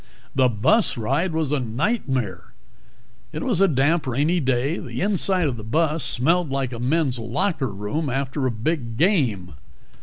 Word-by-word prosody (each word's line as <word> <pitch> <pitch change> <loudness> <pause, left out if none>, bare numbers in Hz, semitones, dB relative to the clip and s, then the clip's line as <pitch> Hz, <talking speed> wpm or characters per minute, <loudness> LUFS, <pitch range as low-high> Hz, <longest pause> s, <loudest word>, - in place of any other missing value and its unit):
The 130 -2 +3
bus 125 - +2
ride 165 +11 0
was 160 -3 -1
a 150 - +1
nightmare. 125 - -2 0.8
It - - -4
was 235 -9 +1
a 195 - +6
damp, 145 +2 +1
rainy 145 +8 +1
day; 135 +3 0
the - - -6
inside 190 -2 +1
of 125 -4 -3
the 110 - -8
bus 155 +7 0
smelled 165 +6 +2
like 135 -2 -2
the 120 - -6
men's 130 0 0
locker 135 - -1
room 105 +10 -3
after 135 +1 -1
a - - 0
big 115 0 -3
game. 130 - +1
135 Hz, 160 wpm, -23 LUFS, 120-165 Hz, 0.8 s, a